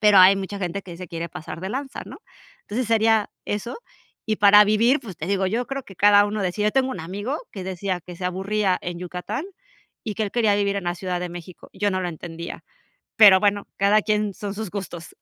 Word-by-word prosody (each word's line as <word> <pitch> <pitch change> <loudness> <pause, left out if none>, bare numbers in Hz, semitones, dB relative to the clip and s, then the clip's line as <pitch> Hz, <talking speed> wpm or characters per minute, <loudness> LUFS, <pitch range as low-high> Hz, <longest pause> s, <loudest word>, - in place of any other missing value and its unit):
pero, 210 -2 +5
hay 185 +2 +8
mucha 195 +1 -5
gente 185 +1 -3
que 175 -2 -10
se 180 -2 -8
quiere 170 0 -5
pasar 160 +2 -8
de 190 - -4
lanza, 270 +1 -4
¿no? - - -10 0.4
Entonces, 240 +3 -3
sería 225 -1 +3 0.2
eso. 210 +3 -3 0.5
Y 215 -1 0
para 205 +1 +7
vivir, 230 +7 +3
pues, 200 - -9
te 155 - -4
digo, 195 0 +1
yo 235 +5 -1
creo 275 0 -4
que 195 - -14
cada 205 0 +6
uno 210 0 -3
decida. 210 +3 0
Tengo 265 +1 +2
un 185 - -5
amigo 205 - -4 0.2
que 190 -3 -6
decía 185 0 -3
que 175 0 -11
se 180 - -7
aburría 190 +1 0
en 175 -1 -5
Yucatán, 180 - -5 0.6
y 215 - -3
que 220 - -2
él 200 - -4
quería 220 -4 +3
vivir 200 -1 0
en 195 - -3
la 175 0 -1
Ciudad 180 -1 -3
de 180 - -3
México. 175 0 -10
Yo 205 +1 0
no 185 - -1
lo 180 - -2
entendía, 170 0 -8 0.5
pero 195 -3 +8
bueno, 205 -1 +1
cada 205 +2 +4
quien, 210 -2 0
son 205 -1 -5
sus 215 -3 -5
gustos. 175 -5 -7
200 Hz, 225 wpm, -23 LUFS, 180-215 Hz, 0.6 s, hay